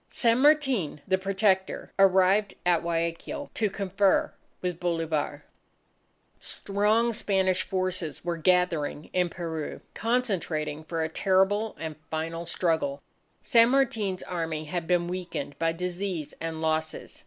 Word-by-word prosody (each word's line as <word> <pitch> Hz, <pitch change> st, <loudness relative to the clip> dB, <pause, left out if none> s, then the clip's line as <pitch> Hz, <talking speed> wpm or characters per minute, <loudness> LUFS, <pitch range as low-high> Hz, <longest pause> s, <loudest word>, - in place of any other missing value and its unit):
San 235 Hz, -1 st, +3 dB
Martin 270 Hz, -, +3 dB
the 190 Hz, 0 st, +2 dB
Protector 190 Hz, 0 st, 0 dB
arrived 195 Hz, +2 st, +4 dB
at 175 Hz, -2 st, +3 dB
Guayaquil 170 Hz, -, -3 dB
to 215 Hz, -2 st, +1 dB
confer 195 Hz, 0 st, +1 dB, 0.3 s
with 180 Hz, -2 st, -3 dB
Bolivar. 165 Hz, -3 st, -1 dB, 0.9 s
Strong 215 Hz, +4 st, +1 dB
Spanish 190 Hz, -4 st, +1 dB
forces 185 Hz, -5 st, -2 dB
were 175 Hz, -1 st, 0 dB
gathering 165 Hz, -3 st, +1 dB
in 180 Hz, -1 st, +2 dB
Peru, 165 Hz, -3 st, -5 dB
concentrating 185 Hz, -11 st, -1 dB
for 165 Hz, 0 st, -2 dB
a -, -, 0 dB
terrible, 195 Hz, +5 st, +1 dB
and 160 Hz, -1 st, -5 dB
final 165 Hz, +1 st, -3 dB
struggle. 160 Hz, -5 st, 0 dB, 0.4 s
San 230 Hz, 0 st, +6 dB
Martin's 225 Hz, -8 st, +1 dB
Army 165 Hz, -3 st, -3 dB
had 165 Hz, +2 st, -3 dB
been 175 Hz, -1 st, +2 dB
weakened 175 Hz, -5 st, -4 dB
by 165 Hz, 0 st, +2 dB
disease 180 Hz, -2 st, -3 dB
and 160 Hz, -1 st, -4 dB
losses. 160 Hz, 0 st, -2 dB
180 Hz, 120 wpm, -27 LUFS, 165-200 Hz, 0.9 s, San